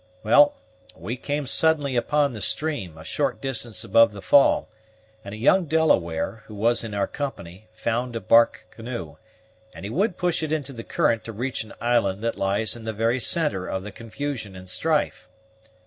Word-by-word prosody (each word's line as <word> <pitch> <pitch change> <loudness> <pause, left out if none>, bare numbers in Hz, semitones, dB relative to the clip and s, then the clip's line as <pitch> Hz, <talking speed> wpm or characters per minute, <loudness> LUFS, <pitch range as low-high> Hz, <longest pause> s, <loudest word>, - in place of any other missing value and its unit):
Well, 145 +7 +5 0.4
we 95 +9 -5
came 145 +3 -3
suddenly 145 -1 +1
upon 140 +3 +1
the 110 - -7
stream, 140 - -1
a 80 - -10
short - - -1
distance 120 -4 -2
above 115 -2 +4
the 100 - -9
fall, 140 - +4 0.6
and 100 +1 -7
a - - -9
young 175 - +3
Delaware, 110 - +1
who 110 - -10
was 115 +4 +1
in 110 -3 -6
our 100 -1 +1
company, 110 -9 -7
found 115 +2 -2
a - - -1
bark 115 +3 +3
canoe, 120 +1 -7 0.6
and - - -8
he 100 - -5
would 195 - 0
push 175 -2 0
into 150 -3 -2
the 115 -2 -8
current 115 -1 +1
to 115 - -5
reach 120 +3 -3
an 110 - -13
island 115 -4 +1
that 115 - -1
lies 100 +4 +1
in 115 - -10
the 110 - -3
very 115 +4 +1
centre 145 - +1
of 95 - -3
the 105 - -7
confusion 115 -1 -6
and 95 0 -11
strife. 150 - -1
115 Hz, 180 wpm, -24 LUFS, 105-145 Hz, 0.6 s, Well